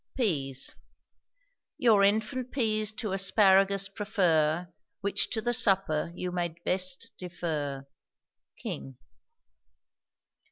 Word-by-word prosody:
PEAS. 140 Hz, -, 0 dB, 1.0 s
Your 220 Hz, -5 st, +4 dB
infant 220 Hz, +5 st, 0 dB
peas 215 Hz, -4 st, +1 dB
to 215 Hz, -2 st, -4 dB
asparagus 195 Hz, 0 st, +3 dB
prefer; 180 Hz, -6 st, +1 dB, 0.3 s
Which 200 Hz, 0 st, +1 dB
to 220 Hz, -2 st, -2 dB
the 240 Hz, +1 st, 0 dB
supper 195 Hz, -9 st, +1 dB
you 180 Hz, 0 st, -4 dB
may 175 Hz, -2 st, -2 dB
best 185 Hz, -1 st, +1 dB
defer. 155 Hz, -6 st, -4 dB, 0.7 s
KING. 65 Hz, -1 st, -7 dB
195 Hz, 90 wpm, -28 LUFS, 165-215 Hz, 1.0 s, Your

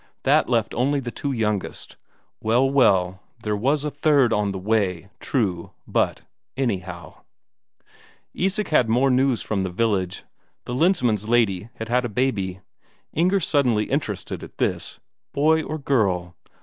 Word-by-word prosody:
That -, -, +3 dB
left 115 Hz, -3 st, +1 dB
only 140 Hz, +4 st, +1 dB
the 120 Hz, -3 st, -5 dB
two 140 Hz, -, -3 dB
youngest 105 Hz, -5 st, -2 dB, 0.5 s
well, 120 Hz, +4 st, +3 dB
well, 95 Hz, -9 st, +3 dB, 0.2 s
there 105 Hz, -1 st, 0 dB
was 135 Hz, +8 st, +1 dB
a 150 Hz, -, -2 dB
third 140 Hz, -6 st, +3 dB
on 105 Hz, -1 st, +1 dB
the 95 Hz, -, -4 dB
way, 95 Hz, -2 st, -1 dB
true, 95 Hz, -10 st, -2 dB
but, -, -, 0 dB, 0.3 s
anyhow... 95 Hz, -9 st, -3 dB, 1.1 s
Isak 195 Hz, +3 st, -1 dB
had 130 Hz, -7 st, +3 dB
more 130 Hz, +4 st, +3 dB
news 130 Hz, -1 st, +2 dB
from 105 Hz, -3 st, -1 dB
the 95 Hz, -, -2 dB
village: 95 Hz, -2 st, -1 dB, 0.4 s
the 125 Hz, -, -5 dB
Lensmand's 125 Hz, -, +1 dB
lady 110 Hz, -4 st, +2 dB
had 110 Hz, -, -6 dB
had 125 Hz, +1 st, +2 dB
a 120 Hz, -, -2 dB
baby. 100 Hz, -6 st, -1 dB, 0.5 s
Inger 185 Hz, +5 st, +2 dB
suddenly 130 Hz, -, +1 dB
interested -, -, -3 dB
at -, -, -12 dB
this: -, -, -2 dB, 0.3 s
"Boy 160 Hz, +3 st, +3 dB
or 155 Hz, 0 st, -4 dB
girl?" 95 Hz, -, 0 dB
115 Hz, 145 wpm, -23 LUFS, 100-135 Hz, 1.1 s, That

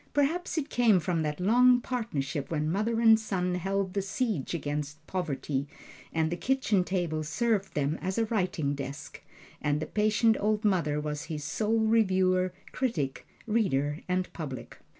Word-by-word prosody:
Perhaps 325 Hz, +6 st, +1 dB
it 300 Hz, -1 st, -2 dB
came 225 Hz, -6 st, +4 dB
from 170 Hz, 0 st, -1 dB
that 150 Hz, 0 st, -2 dB
long 245 Hz, +6 st, +5 dB
partnership 150 Hz, -, -3 dB
when 155 Hz, -1 st, -1 dB
mother 220 Hz, +5 st, 0 dB
and 225 Hz, -1 st, +7 dB
son 180 Hz, -4 st, -1 dB
held 190 Hz, +1 st, -1 dB
the 200 Hz, -, 0 dB
siege 195 Hz, -, -2 dB
against 150 Hz, 0 st, -4 dB
poverty, 145 Hz, -6 st, -2 dB, 0.4 s
and 160 Hz, 0 st, 0 dB
the -, -, 0 dB
kitchen 225 Hz, -3 st, +1 dB
table 175 Hz, -4 st, -1 dB
served 210 Hz, +5 st, 0 dB
them 145 Hz, +1 st, 0 dB
as 190 Hz, +2 st, -2 dB
a 225 Hz, -, +2 dB
writing 180 Hz, -9 st, 0 dB
desk, 140 Hz, 0 st, -7 dB, 0.4 s
and 150 Hz, 0 st, +1 dB
the 155 Hz, -, -2 dB
patient 215 Hz, +1 st, +2 dB
old 215 Hz, +1 st, 0 dB
mother 165 Hz, -7 st, +2 dB
was 150 Hz, +1 st, -4 dB
his 155 Hz, -2 st, -5 dB
sole 215 Hz, +9 st, 0 dB
reviewer, 185 Hz, -4 st, +3 dB, 0.2 s
critic, 160 Hz, -, -2 dB, 0.2 s
reader 155 Hz, -10 st, 0 dB
and 185 Hz, 0 st, -1 dB
public. 140 Hz, -7 st, -7 dB
185 Hz, 155 wpm, -29 LUFS, 150-220 Hz, 0.4 s, and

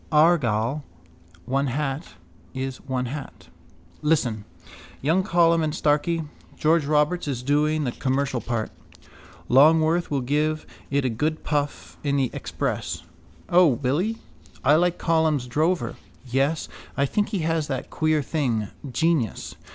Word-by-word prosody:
Argal, 145 Hz, -5 st, +3 dB, 0.6 s
one 135 Hz, +3 st, 0 dB
hat 135 Hz, +3 st, -3 dB, 0.4 s
is 130 Hz, -1 st, -3 dB
one 130 Hz, -2 st, -3 dB
hat. 135 Hz, +3 st, -7 dB, 0.5 s
Listen. 125 Hz, -9 st, +1 dB, 0.5 s
Young 160 Hz, +7 st, +2 dB
Colum 170 Hz, -4 st, +3 dB
and 155 Hz, 0 st, -1 dB
Starkey. 155 Hz, +3 st, +1 dB, 0.3 s
George 155 Hz, -1 st, +2 dB
Roberts 150 Hz, +3 st, +2 dB
is 130 Hz, -3 st, -3 dB
doing 150 Hz, +3 st, +2 dB
the 125 Hz, -, -1 dB
commercial 130 Hz, -1 st, -1 dB
part. 115 Hz, -2 st, -2 dB, 0.8 s
Longworth 160 Hz, +5 st, +5 dB
will 140 Hz, -2 st, 0 dB
give 150 Hz, +4 st, 0 dB, 0.2 s
it 140 Hz, -1 st, +1 dB
a -, -, +2 dB
good 155 Hz, +7 st, -1 dB
puff 145 Hz, -1 st, -2 dB
in 140 Hz, -1 st, +1 dB
the 130 Hz, -3 st, +1 dB
Express. -, -, -3 dB, 0.4 s
O, 180 Hz, 0 st, +6 dB
will 130 Hz, +2 st, +1 dB
he? 220 Hz, +5 st, -1 dB, 0.5 s
I 140 Hz, -, +5 dB
liked 175 Hz, +2 st, +3 dB
Colum's 160 Hz, -5 st, +1 dB
Drover. 155 Hz, +8 st, 0 dB, 0.3 s
Yes, 135 Hz, +5 st, 0 dB, 0.3 s
I 140 Hz, -, +3 dB
think 205 Hz, +9 st, 0 dB
he 195 Hz, -, -2 dB
has 165 Hz, -2 st, 0 dB
that 135 Hz, -2 st, -4 dB
queer 155 Hz, -2 st, +1 dB
thing 120 Hz, -9 st, -1 dB, 0.2 s
genius. 160 Hz, -, 0 dB
150 Hz, 135 wpm, -24 LUFS, 130-160 Hz, 0.8 s, O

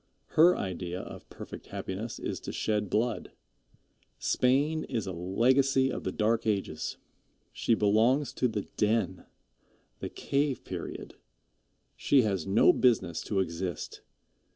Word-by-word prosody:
Her 175 Hz, +3 st, +6 dB
idea 90 Hz, -1 st, -4 dB
of -, -, -10 dB
perfect -, -, -9 dB
happiness 105 Hz, +5 st, -5 dB
is -, -, -4 dB
to -, -, -6 dB
shed 105 Hz, -2 st, -1 dB
blood. 115 Hz, +3 st, -1 dB, 0.8 s
Spain 145 Hz, +5 st, +2 dB
is 115 Hz, -4 st, -2 dB
a 95 Hz, -, -4 dB
legacy 130 Hz, +9 st, +2 dB
of -, -, -5 dB
the 95 Hz, -, 0 dB
Dark 110 Hz, +3 st, +1 dB
Ages. 100 Hz, -7 st, -2 dB, 0.6 s
She 115 Hz, -, +2 dB
belongs 115 Hz, +8 st, +3 dB
to 125 Hz, -, +1 dB
the 105 Hz, -3 st, -3 dB
den, 105 Hz, -3 st, 0 dB, 0.7 s
the -, -, -4 dB
cave 140 Hz, -1 st, -1 dB
period. -, -, -7 dB, 0.8 s
She 135 Hz, -3 st, +4 dB
has 95 Hz, -6 st, -1 dB
no 100 Hz, +4 st, +5 dB
business 100 Hz, -10 st, +2 dB
to 100 Hz, -2 st, +1 dB
exist. 90 Hz, -2 st, -4 dB
110 Hz, 130 wpm, -29 LUFS, 95-130 Hz, 0.8 s, Her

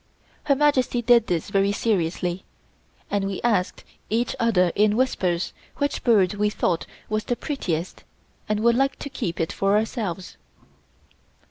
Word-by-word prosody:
Her 280 Hz, -2 st, +3 dB
Majesty 265 Hz, -4 st, +2 dB
did 235 Hz, -1 st, +5 dB
this 175 Hz, +2 st, -2 dB
very 195 Hz, 0 st, +2 dB
seriously 180 Hz, -3 st, -1 dB, 0.7 s
and 200 Hz, -1 st, 0 dB
we 195 Hz, -1 st, -3 dB
asked 205 Hz, -6 st, 0 dB, 0.3 s
each 230 Hz, +3 st, 0 dB
other 190 Hz, -7 st, +3 dB
in 210 Hz, 0 st, +3 dB
whispers 185 Hz, -9 st, 0 dB, 0.2 s
which 285 Hz, 0 st, -1 dB
bird 205 Hz, -6 st, +4 dB
we 210 Hz, 0 st, +1 dB
thought 175 Hz, -5 st, -1 dB, 0.2 s
was 215 Hz, 0 st, -1 dB
the 245 Hz, -, 0 dB
prettiest 185 Hz, -, -3 dB, 0.5 s
and 215 Hz, 0 st, 0 dB
would 235 Hz, +1 st, +4 dB
like 270 Hz, +2 st, +2 dB
to 280 Hz, -, -7 dB
keep 175 Hz, -10 st, -4 dB
it 165 Hz, -, -1 dB
for 195 Hz, +1 st, +2 dB
ourselves. 210 Hz, -5 st, -3 dB
210 Hz, 145 wpm, -24 LUFS, 185-240 Hz, 0.7 s, did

